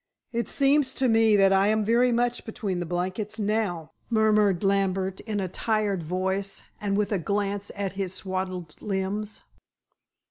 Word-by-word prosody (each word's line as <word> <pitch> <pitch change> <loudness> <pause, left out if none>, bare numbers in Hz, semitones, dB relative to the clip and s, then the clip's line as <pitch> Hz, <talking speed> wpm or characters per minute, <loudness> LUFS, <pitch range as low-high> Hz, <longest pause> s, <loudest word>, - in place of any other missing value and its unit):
"It 235 0 -1
seems 275 -1 +3
to 260 - +2
me 225 -2 +4
that 195 -1 +5
I 195 +1 +4
am 215 0 +2
very 240 +3 +3
much 240 +1 0
between 200 -5 -3
the 175 - -3
blankets 185 +5 -3
now," 205 -6 -1 0.2
murmured 215 -4 +3
Lambert 195 -1 +1
in 215 -3 -3
a 190 - -1
tired 210 0 -1
voice, 190 +4 -2 0.2
and 200 -1 0
with 210 0 0
a 200 - +1
glance 200 +2 -2
at 200 -2 -3
his 190 -2 -3
swathed 185 -3 -5
limbs. 205 +1 -3
200 Hz, 155 wpm, -26 LUFS, 190-220 Hz, 0.2 s, that